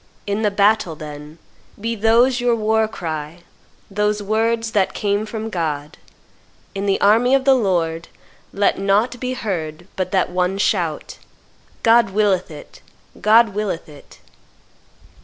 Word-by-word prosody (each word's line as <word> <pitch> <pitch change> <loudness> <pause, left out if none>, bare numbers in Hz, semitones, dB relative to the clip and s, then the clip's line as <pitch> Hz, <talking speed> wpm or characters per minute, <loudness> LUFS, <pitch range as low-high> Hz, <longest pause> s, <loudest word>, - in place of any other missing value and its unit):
In 205 +1 -2
the 210 - +2
battle, 200 -4 +2
then, 150 +1 -10 0.4
be 230 +2 -2
those 235 +4 +3
your 245 -1 +2
war 220 0 +1
cry, 160 -4 -6 0.5
those 210 +1 0
words 225 +2 0
that 195 -3 0
came 205 +1 -1
from 220 0 -5
God; 150 -4 -4 0.7
in 195 +1 -3
the 195 - +1
army 230 +6 +4
of 265 -1 0
the 270 - +6
Lord 170 -8 0 0.4
let 200 -1 +1
nought 205 +5 +1
be 255 +1 -3
heard 175 -8 -4
but 185 -1 -3
that 185 -2 +1
one 180 +1 0
shout, 175 -6 -1 0.6
'God 230 -1 +5
willeth 195 -2 +1
it! 150 -2 -12 0.4
God 220 +3 +5
willeth 200 -4 -4
it! 145 -2 -15
205 Hz, 140 wpm, -20 LUFS, 175-225 Hz, 0.7 s, the